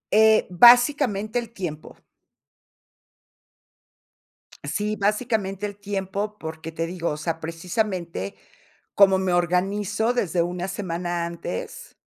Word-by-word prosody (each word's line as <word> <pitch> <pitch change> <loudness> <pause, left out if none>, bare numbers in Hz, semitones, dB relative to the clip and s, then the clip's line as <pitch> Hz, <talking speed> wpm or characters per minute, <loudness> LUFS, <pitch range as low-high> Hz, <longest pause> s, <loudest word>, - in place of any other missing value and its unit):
Eh, 220 0 +6
básicamente 240 - +5
el 235 -2 -7
tiempo. 175 -8 -7 2.7
Sí, 210 +8 -2
básicamente 210 -1 -1
el 205 -1 -5
tiempo, 200 +1 -4
porque 160 0 -7
te 165 +1 -3
digo, 170 0 -3
o 150 - -3
sea, 165 +1 -3
precisamente, 170 - -3 0.6
como 195 -1 +6
me 190 -1 0
organizo 195 +6 +1
desde 180 -8 0
una 175 +1 -3
semana 175 -3 -3
antes 170 - -7
190 Hz, 105 wpm, -24 LUFS, 170-210 Hz, 2.7 s, Eh